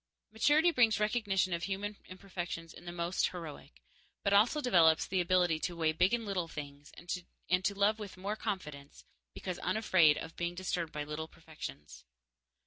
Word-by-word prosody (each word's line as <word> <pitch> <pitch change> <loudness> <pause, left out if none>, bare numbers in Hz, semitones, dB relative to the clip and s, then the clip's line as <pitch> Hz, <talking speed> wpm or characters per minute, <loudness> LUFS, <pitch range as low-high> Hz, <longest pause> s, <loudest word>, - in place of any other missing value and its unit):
Maturity 300 +9 +4
brings 230 -8 +4
recognition 210 -4 +1
of 170 0 -2
human 200 +1 -3
imperfections 180 -3 -6
in 175 - -13
the 175 - -5
most 175 +1 0
heroic, 150 - -9 0.4
but 200 - +2
also 220 +9 +5
develops 170 - +4
the 185 -1 0
ability 175 -2 +2
to 175 +2 -3
weigh 160 -2 +2
big 180 +5 +3
and 235 -1 0
little 190 -4 -2
things 145 -1 -8
and 180 +1 -3
to 200 +1 0
love 205 +2 +2
with 205 -3 -8
more 200 +3 -3
confidence 150 -11 -6 0.3
because 185 -2 -5
unafraid 185 -6 +4
of 160 0 -7
being 175 0 -3
disturbed 175 -3 -2
by 150 - -3
little 150 +2 -5
imperfections. 75 - -10
180 Hz, 165 wpm, -32 LUFS, 160-200 Hz, 0.4 s, also